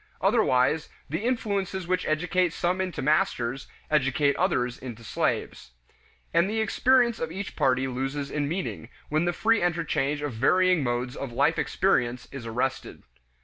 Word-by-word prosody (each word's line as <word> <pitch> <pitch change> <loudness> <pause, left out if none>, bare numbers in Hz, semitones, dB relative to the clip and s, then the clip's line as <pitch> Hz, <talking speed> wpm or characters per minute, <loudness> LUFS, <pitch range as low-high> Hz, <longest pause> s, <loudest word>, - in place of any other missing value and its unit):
Otherwise, 130 +5 +2 0.2
the 160 +7 -2
influences 200 -6 -1
which 185 0 0
educate 175 +2 +1
some 180 +2 0
into 185 -7 -3
masters, 135 -3 0 0.2
educate 140 0 +2
others 125 -10 0
into 120 -3 -8
slaves. 65 - -2 0.6
And 170 +3 +3
the 220 +1 -1
experience 240 +2 +3
of 160 - -3
each 190 +2 -6
party 130 0 +2
loses 135 +2 -3
in 145 -1 -1
meaning, 170 -8 -4 0.2
when 155 +3 +1
the 175 - +2
free 225 +4 +2
interchange 150 -4 0
of 145 -4 -3
varying 180 +9 +3
modes 125 +1 -2
of 135 -3 -5
life 120 - +2
experience 120 +1 0
is 130 -4 -7
arrested. 125 +4 -3
150 Hz, 145 wpm, -26 LUFS, 130-185 Hz, 0.6 s, And